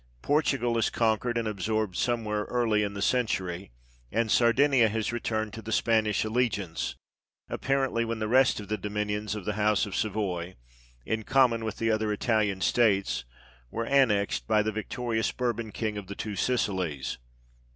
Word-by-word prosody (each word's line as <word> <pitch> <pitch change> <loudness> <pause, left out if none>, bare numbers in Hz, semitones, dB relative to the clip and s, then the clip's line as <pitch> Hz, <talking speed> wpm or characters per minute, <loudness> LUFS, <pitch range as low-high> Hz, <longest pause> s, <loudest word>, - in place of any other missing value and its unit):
Portugal 135 -6 +1
is 110 - +2
conquered 115 +1 +1
and 115 -1 -1
absorbed 105 -1 -1
somewhere 110 -3 -1
early 115 -4 +1
in 100 -1 -2
the 100 - -2
century, 95 -8 0 0.4
and 115 -1 0
Sardinia 125 0 +4
has 110 +1 -1
returned 110 -2 -2
to 110 - -7
the 110 - -7
Spanish 110 -2 +2
allegiance, 110 -7 -1 0.5
apparently 135 -3 0
when 115 0 -3
the 110 -1 -2
rest 130 +2 +4
of 105 - -8
the 105 +1 -2
dominions 105 0 -2
of 105 -4 -6
the 105 - -1
house 105 0 +2
of 100 - -6
Savoy, 95 -4 -2 0.5
in 110 0 -1
common 120 -1 +3
with 110 -1 -4
the 115 0 +1
other 110 -1 0
Italian 105 -3 0
states, 100 - +2 0.4
were 115 - -3
annexed 115 -7 +2
by 105 0 +3
the 110 - -1
victorious 110 +2 -2
Bourbon 115 -3 -2
king 105 -1 -3
of 100 - -10
the 100 - -6
Two 105 -2 -4
Sicilies. 95 - -1
110 Hz, 160 wpm, -28 LUFS, 105-115 Hz, 0.5 s, Sardinia